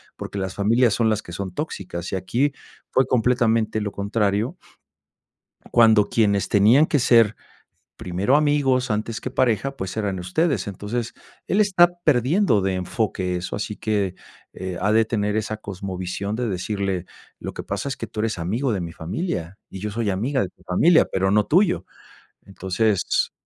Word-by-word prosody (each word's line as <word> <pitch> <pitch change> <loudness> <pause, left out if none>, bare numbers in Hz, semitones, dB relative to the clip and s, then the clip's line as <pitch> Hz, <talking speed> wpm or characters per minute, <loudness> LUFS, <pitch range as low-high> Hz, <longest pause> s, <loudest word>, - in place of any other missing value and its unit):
porque 100 - -6
las 95 -1 -4
familias 115 +2 +3
son 115 -2 +2
las 110 -1 0
que 85 - -11
son 95 -1 -5
tóxicas, 90 - -5
y - - -1
aquí 120 +10 0 0.4
fue 130 - +3
completamente 115 -3 +2
lo 105 -1 -3
contrario 105 - -1 1.2
cuando 110 -3 +5
quienes 100 -3 +2
tenían 110 +9 +5
que 150 -3 +1
ser 115 -3 +4 0.6
primero 95 +10 +1
amigos 140 -4 +2
antes 110 +1 -2
que 130 - -5
pareja, 130 +1 +1
pues, 95 -2 -5
eran 100 -4 -1
ustedes, 135 - 0
entonces, 110 +4 -4 0.3
él 200 - +1
está 185 -4 +5 0.2
perdiendo 145 - +3
de 95 0 0
enfoque 90 0 -2
eso, 90 - -4
así 105 0 -4
que, 100 -4 -1 0.4
eh, 95 -1 -5
ha 105 +3 +2
de 115 0 +4
tener 105 -2 -1
esa 110 0 -2
cosmovisión 95 0 -4
de 125 - -1
decirle, 95 -1 -2 0.3
lo - - -6
que - - -5
pasa 100 +6 -4
es 135 - -4
que - - -5
tú 110 - -6
eres 110 -3 -1
amigo 115 +10 -1
de 95 - -1
mi 85 -1 -6
familia 85 - -4
y 95 - -8
yo 105 - -3
soy 110 0 -1
amiga 125 +8 0
de 90 - -4
tu - - -26
familia, 160 - +4
pero 95 0 +1
no 105 0 +3
tuyo, 155 - +2 0.6
entonces, 100 +1 0
105 Hz, 170 wpm, -23 LUFS, 95-120 Hz, 1.2 s, cuando